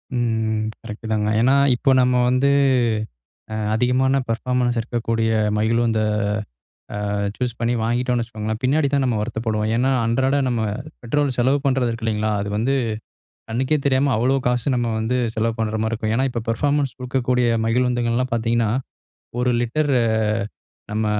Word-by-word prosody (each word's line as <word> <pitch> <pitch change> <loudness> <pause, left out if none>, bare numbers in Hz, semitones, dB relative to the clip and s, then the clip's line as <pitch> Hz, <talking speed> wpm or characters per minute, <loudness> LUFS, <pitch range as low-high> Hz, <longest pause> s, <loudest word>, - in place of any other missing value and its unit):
ம் 110 -2 0 0.2
கரெக்ட்தாங்க. 110 -1 -3
ஏன்னா 130 +3 +4 0.2
இப்போ 135 +3 +2
நம்ம 125 0 +2
வந்து 130 +2 +2 1.0
அ - - -3 0.2
அதிகமான 125 +3 +2
பெர்ஃபார்மன்ஸ் 125 +1 0
இருக்கக்கூடிய 115 -1 -1 0.3
மகிழுந்த 115 +1 +1 1.1
அ - - -1 0.2
சூஸ் 125 -2 -2
பண்ணி 115 +1 +1
வாங்கிட்டோம்னு 120 +2 0
வச்சுக்கோங்களேன், 110 -1 -4
பின்னாடிதான் 140 +1 +2
நம்ம 125 -3 +1
வருத்தப்படுவோம். 110 -1 -2
ஏன்னா 130 +3 +2
அன்றாட 130 +5 +1
நம்ம 120 -2 0 0.4
பெட்ரோல் 140 +3 0
செலவு 130 +4 +3
பண்றது 130 -3 +2
இருக்கு 115 0 -5
இல்லைங்களா, 110 0 0
அது 100 - -4
வந்து 130 +6 +1 0.8
கண்ணுக்கே 130 +6 +1
தெரியாம 135 0 +2
அவ்வளோ 130 +4 +2
காசு 125 +2 +1
நம்ம 120 -1 0
வந்து 110 +3 0 0.2
செலவு 115 +1 0
பண்ற 110 -1 -1
மாரி 110 - -1
இருக்கும். 110 -1 -1
ஏன்னா 130 +2 +2
இப்போ 120 -2 -3
பெர்ஃபார்மன்ஸ் 140 +2 0
கொடுக்கக்கூடிய 125 -1 0 0.2
மகிழுந்துகள்ல்லாம் 120 +1 0
பார்த்தீங்கன்னா, 115 -1 +1 0.7
ஒரு 125 0 +2
லிட்டர் 145 +5 0
அ - - +1 0.9
நம்ம 110 0 0
120 Hz, 140 wpm, -21 LUFS, 110-130 Hz, 1.1 s, ஏன்னா